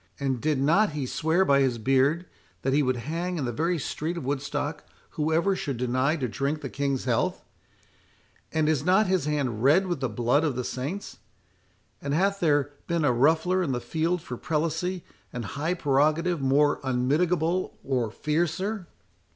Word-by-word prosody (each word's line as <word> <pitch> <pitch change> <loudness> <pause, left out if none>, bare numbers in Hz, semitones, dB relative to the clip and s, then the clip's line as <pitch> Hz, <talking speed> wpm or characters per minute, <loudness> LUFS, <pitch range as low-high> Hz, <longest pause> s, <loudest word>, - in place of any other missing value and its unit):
—and 135 -4 -1
did 150 -3 +1
not 165 +7 +3
he 145 -3 -2
swear 160 +8 +1
by 140 -3 +4
his 130 -3 +2
beard, 135 +8 +2 0.4
that 135 - +1
he 145 - +4
would 130 -2 +1
hang 170 +8 -3
in 145 - -2
the 120 - -1
very 165 +7 0
street 160 +3 -3
of 160 - -5
Woodstock 145 +2 -3 0.3
whoever 160 +5 +1
should 140 -8 -3
deny 130 +5 +1
to 135 -6 -2
drink 140 +6 -2
the 135 - -6
King's 140 -2 -1
health?—and 140 +5 -4
is 155 -3 +1
not 185 +5 +4
his 185 -5 +1
hand 140 -7 -1
red 155 +9 +5
with 175 -5 -2
the 130 -2 -1
blood 120 +7 +1
of 150 -5 0
the 125 - -2
saints?—and 110 - -7
hath 195 +3 +1
there 145 -4 +2 0.2
been 170 -3 +1
a 135 - +4
ruffler 160 +8 +3
in 150 -7 -1
the 120 - -1
field 160 +7 -1
for 125 -6 -6
prelacy 165 +4 -2 0.3
and 120 -2 -5
high 155 +6 -1
prerogative 155 +3 +1
more 145 +2 +3
unmitigable 160 +7 0
or 125 -5 0
fiercer?" 175 - -1
150 Hz, 165 wpm, -26 LUFS, 130-170 Hz, 0.4 s, red